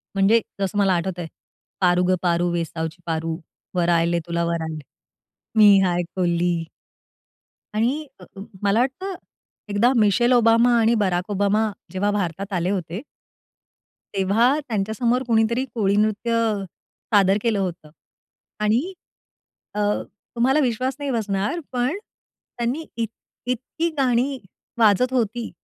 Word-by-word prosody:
म्हणजे 200 Hz, +4 st, +4 dB, 0.2 s
जसं 195 Hz, +1 st, -1 dB
मला 195 Hz, -2 st, +3 dB
आठवतंय, 175 Hz, 0 st, -2 dB, 0.5 s
पारू 180 Hz, -1 st, +3 dB
गं 185 Hz, -, +3 dB
पारू 175 Hz, 0 st, +1 dB
वेसावची 165 Hz, 0 st, -3 dB
पारू, 165 Hz, 0 st, -2 dB, 0.4 s
वर 175 Hz, -1 st, +1 dB
आयले 170 Hz, 0 st, +2 dB
तुला 170 Hz, 0 st, -1 dB
वर 170 Hz, -1 st, -1 dB
आयले. 160 Hz, -1 st, -5 dB, 0.8 s
मी 205 Hz, -2 st, +8 dB
हाय 175 Hz, -1 st, +1 dB
कोली. 175 Hz, -2 st, +1 dB, 1.1 s
आणि 255 Hz, +8 st, 0 dB
अ, -, -, -11 dB, 0.4 s
मला 200 Hz, +3 st, +3 dB
वाटतं 370 Hz, +10 st, -2 dB, 0.5 s
एकदा 205 Hz, +5 st, +3 dB
मिशेल 235 Hz, +3 st, +3 dB
ओबामा 235 Hz, 0 st, +5 dB
आणि 225 Hz, +1 st, +3 dB
बराक 180 Hz, +1 st, -1 dB
ओबामा 205 Hz, +2 st, +1 dB, 0.2 s
जेव्हा 195 Hz, +2 st, 0 dB
भारतात 195 Hz, 0 st, -3 dB
आले 180 Hz, 0 st, 0 dB
होते 185 Hz, -1 st, -3 dB, 1.1 s
तेव्हा 220 Hz, +8 st, +3 dB
त्यांच्यासमोर 230 Hz, +4 st, 0 dB
कुणीतरी 235 Hz, +2 st, +2 dB
कोळी 200 Hz, -4 st, +1 dB
नृत्य 215 Hz, +2 st, +1 dB
अ, 225 Hz, -3 st, +1 dB, 0.5 s
सादर 195 Hz, 0 st, +5 dB
केलं 230 Hz, -3 st, +1 dB
होतं 175 Hz, -5 st, -4 dB, 0.7 s
आणि 230 Hz, -, +1 dB, 0.8 s
अ, -, -, -4 dB, 0.6 s
तुम्हाला 265 Hz, +5 st, +3 dB
विश्वास 255 Hz, 0 st, 0 dB
नाही 285 Hz, -1 st, -3 dB
बसणार, 210 Hz, -, -1 dB
पण 250 Hz, +6 st, 0 dB, 0.6 s
त्यांनी 245 Hz, +7 st, -1 dB
इत 230 Hz, -1 st, -1 dB, 0.4 s
इतकी 255 Hz, +7 st, -2 dB
गाणी 260 Hz, +1 st, +1 dB, 0.4 s
वाजत 225 Hz, +3 st, +4 dB
होती, 235 Hz, -1 st, -1 dB
205 Hz, 125 wpm, -23 LUFS, 180-240 Hz, 1.1 s, मी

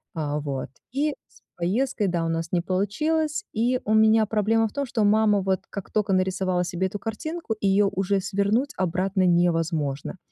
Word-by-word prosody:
А 150 Hz, -1 st, -2 dB
вот 140 Hz, -4 st, -4 dB, 0.2 s
и 290 Hz, +3 st, 0 dB
с -, -, -23 dB, 0.2 s
поездкой, 210 Hz, +5 st, 0 dB
да, 175 Hz, -2 st, 0 dB
у 165 Hz, -, -1 dB
нас 165 Hz, 0 st, -2 dB
не 175 Hz, -, +1 dB
получилось. 300 Hz, -, 0 dB
И 245 Hz, +3 st, +1 dB
у 215 Hz, -, 0 dB
меня 220 Hz, 0 st, +5 dB
проблема 225 Hz, +1 st, +2 dB
в -, -, -10 dB
том, 280 Hz, +3 st, -2 dB
что 235 Hz, -4 st, -1 dB
мама, 210 Hz, -1 st, +4 dB
вот, 190 Hz, -1 st, 0 dB
как 200 Hz, -, -6 dB
только 210 Hz, -2 st, +1 dB
нарисовала 185 Hz, -1 st, +1 dB
себе 180 Hz, +1 st, -2 dB
эту 205 Hz, -, -6 dB
картинку, 235 Hz, +4 st, -4 dB
её 200 Hz, 0 st, +3 dB
уже 195 Hz, +1 st, 0 dB
свернуть 200 Hz, +7 st, 0 dB
обратно 185 Hz, +2 st, 0 dB
невозможно. 165 Hz, -3 st, +1 dB
195 Hz, 175 wpm, -25 LUFS, 180-220 Hz, 0.2 s, меня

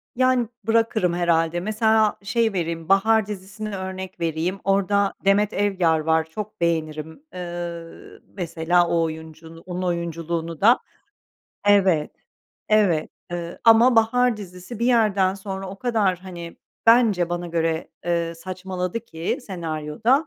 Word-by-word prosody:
Yani, 255 Hz, -2 st, +2 dB, 0.2 s
bırakırım 225 Hz, -5 st, +2 dB
herhâlde. 170 Hz, -1 st, +1 dB
Mesela, 220 Hz, +2 st, +2 dB
şey 225 Hz, 0 st, +1 dB
vereyim, 165 Hz, -1 st, -3 dB
Bahar 220 Hz, +2 st, +4 dB
dizisini 200 Hz, +1 st, -6 dB
örnek 190 Hz, -1 st, -6 dB
vereyim. 165 Hz, +3 st, -1 dB
Orada 200 Hz, +1 st, +2 dB
Demet 205 Hz, +2 st, +3 dB
Evgar 185 Hz, -6 st, +2 dB
var, 160 Hz, +1 st, +2 dB
çok 210 Hz, +2 st, -7 dB
beğenirim. 160 Hz, -, -2 dB
Iıı, 175 Hz, -2 st, -7 dB
mesela 175 Hz, -1 st, 0 dB
o 170 Hz, -1 st, +1 dB
oyuncu 160 Hz, +1 st, -7 dB
onun 180 Hz, 0 st, -4 dB
oyunculuğunu 170 Hz, -1 st, -3 dB
da. 235 Hz, +5 st, +6 dB, 0.9 s
Evet, 190 Hz, -7 st, +4 dB, 0.6 s
evet, 200 Hz, -8 st, +3 dB, 0.2 s
ııı, 170 Hz, -1 st, -5 dB
ama 230 Hz, +2 st, +6 dB
Bahar 240 Hz, +1 st, +3 dB
dizisi 185 Hz, +2 st, -9 dB
bir 235 Hz, -, 0 dB
yerden 205 Hz, -6 st, +3 dB
sonra 195 Hz, -1 st, -6 dB
o 195 Hz, +1 st, -9 dB
kadar, 215 Hz, -7 st, +1 dB
hani, 175 Hz, -3 st, -9 dB, 0.3 s
bence 220 Hz, -7 st, +5 dB
bana 175 Hz, 0 st, -3 dB
göre, 165 Hz, -1 st, -1 dB, 0.2 s
eee, 170 Hz, -1 st, -1 dB
saçmaladı 185 Hz, +3 st, -4 dB
ki 170 Hz, -, -4 dB
senaryoda. 175 Hz, -, -1 dB
185 Hz, 125 wpm, -23 LUFS, 170-215 Hz, 0.9 s, da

